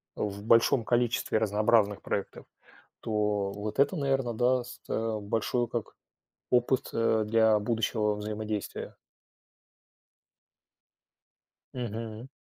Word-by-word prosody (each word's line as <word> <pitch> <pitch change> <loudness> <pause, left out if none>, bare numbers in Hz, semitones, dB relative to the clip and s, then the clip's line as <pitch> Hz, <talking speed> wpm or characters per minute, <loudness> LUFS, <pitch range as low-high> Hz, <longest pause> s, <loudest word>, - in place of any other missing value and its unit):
в 100 -1 -4
большом 115 +2 +4
количестве 120 -2 +1
разнообразных 105 -1 +2
проектов, 100 - -4 0.6
то 105 -2 0
вот 105 +1 -5
это, 145 +6 +3
наверно, 135 -5 0
даст, 125 +1 0
э, 110 -1 -1
большой, 115 +4 -1
как, 115 -2 -4 0.6
опыт, 125 +1 +2
э, 110 -1 +2
для 110 0 +4
будущего 105 -1 0
взаимодействия. 105 0 -4 2.8
Мгм. 115 -1 -5
110 Hz, 90 wpm, -29 LUFS, 105-120 Hz, 2.8 s, большом